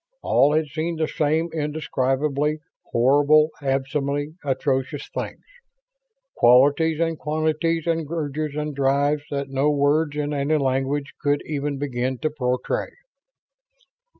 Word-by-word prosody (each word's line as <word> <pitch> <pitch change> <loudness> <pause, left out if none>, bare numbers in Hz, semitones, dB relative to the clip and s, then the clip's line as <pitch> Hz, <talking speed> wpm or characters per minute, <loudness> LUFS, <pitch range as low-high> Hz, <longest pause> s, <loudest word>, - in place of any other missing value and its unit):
All 145 +2 +3
had 155 0 +2
seen 160 +3 -3
the 160 -1 0
same 155 +3 0
indescribably 150 -1 -1 0.3
horrible, 145 +5 +4
abysmally 140 +1 -1
atrocious, 135 -1 -1
things. - - -5 0.9
Qualities 145 +6 +4
and 165 -1 0
quantities 155 +1 0
and 165 -3 -1
urges 155 -2 -3
and 150 0 -3
drives 140 +2 +2
that 140 -1 -3
no 135 +2 +2
words 145 +1 +2
in 150 0 -2
any 145 +2 +1
language 135 +1 -1
could 145 0 +1
even 145 -1 -3
begin 130 -2 -2
to 155 +4 -2
portray. 125 -3 -2
145 Hz, 120 wpm, -23 LUFS, 135-155 Hz, 0.9 s, horrible